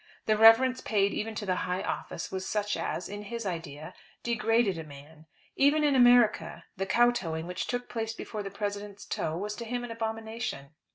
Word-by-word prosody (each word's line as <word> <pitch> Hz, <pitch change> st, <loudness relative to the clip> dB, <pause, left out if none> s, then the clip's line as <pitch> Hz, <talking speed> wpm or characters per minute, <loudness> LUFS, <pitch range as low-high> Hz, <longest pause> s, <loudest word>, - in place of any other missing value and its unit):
The 215 Hz, -, +3 dB
reverence 225 Hz, +4 st, +6 dB
paid 200 Hz, -2 st, +1 dB
even 220 Hz, +1 st, -3 dB
to 210 Hz, -, -4 dB
the 185 Hz, -2 st, 0 dB
high 180 Hz, +1 st, -1 dB
office -, -, -4 dB
was 190 Hz, 0 st, -4 dB
such 210 Hz, -1 st, 0 dB
as, 175 Hz, -, -3 dB
in 205 Hz, +1 st, -6 dB
his 230 Hz, +1 st, -5 dB
idea, 165 Hz, -4 st, -5 dB, 0.3 s
degraded 225 Hz, -4 st, +1 dB
a -, -, -5 dB
man. 150 Hz, +2 st, -14 dB, 0.3 s
Even 290 Hz, +2 st, +4 dB
in 290 Hz, -1 st, +4 dB
America, 245 Hz, -9 st, +4 dB
the 195 Hz, +1 st, -3 dB
Kotooing 190 Hz, -8 st, +2 dB
which 180 Hz, +1 st, -4 dB
took 245 Hz, 0 st, -3 dB
place 225 Hz, -1 st, -3 dB
before 215 Hz, -1 st, -5 dB
the 200 Hz, -, -5 dB
President's 205 Hz, 0 st, -5 dB
toe 160 Hz, +1 st, -2 dB
was 205 Hz, +3 st, -3 dB
to 235 Hz, -, -5 dB
him 245 Hz, +1 st, -3 dB
an 245 Hz, -, -6 dB
abomination. 225 Hz, -9 st, -4 dB
210 Hz, 185 wpm, -29 LUFS, 185-230 Hz, 0.3 s, reverence